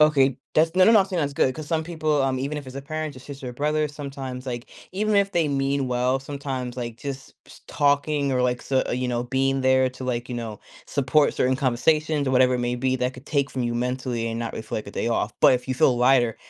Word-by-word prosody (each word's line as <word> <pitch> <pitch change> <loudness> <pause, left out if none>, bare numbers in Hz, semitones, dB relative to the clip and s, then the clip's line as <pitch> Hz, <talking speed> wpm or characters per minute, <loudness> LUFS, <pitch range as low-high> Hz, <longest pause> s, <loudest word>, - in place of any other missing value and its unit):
okay, 140 -4 +4 0.2
that's 160 +2 +3
no 185 - +6
no, 220 +2 +7
I'm 195 - +4
saying 185 -3 -2
that's 145 -2 -1
good 130 -1 +2
'cause 155 -1 -7
some 160 0 -1
people, 155 -4 0
um 130 -1 0
even 140 +3 -3
if 145 - -9
it's 130 +1 -9
a 140 - -4
parent, 155 0 -4
your 130 - -11
sister, 135 -1 -8
or - - -6
brother, 150 +3 0
sometimes, 135 -3 -7
like 120 0 -5 0.2
even 210 +2 0
if 200 0 +2
they 170 -4 +2
mean 140 -1 0
well, 125 +1 +1
sometimes, 135 -3 -5
like, 120 -2 -5
just 135 0 -7
ps - - -16
talking 145 -1 +1
or, 125 - +1
like 125 0 0
so 130 -1 +1
you 125 +1 -1
know, 120 0 -1
being 135 +2 0
there 130 0 +3
to, 130 +1 -9
like 125 -1 -2
you 125 - -4
know, 115 -3 -5 0.3
support 145 +2 +2
certain 130 +1 +1
conversations- 150 +3 +1
or - - +1
whatever 130 0 +4
it 125 - -1
may 120 0 -1
be- 130 +1 0
that 125 0 -1
could 125 +2 -13
take 140 -2 0
from 130 - -3
you 120 0 -1
mentally 125 -1 -2
and 115 0 -3
not 115 -1 -4
reflect 110 -1 -5
a - - -7
day 115 - -2
off, 110 -2 0
but - - +7
if 125 +1 -4
you 130 - 0
feel 125 0 +3
lighter, 125 -2 +3
135 Hz, 250 wpm, -24 LUFS, 125-145 Hz, 0.3 s, no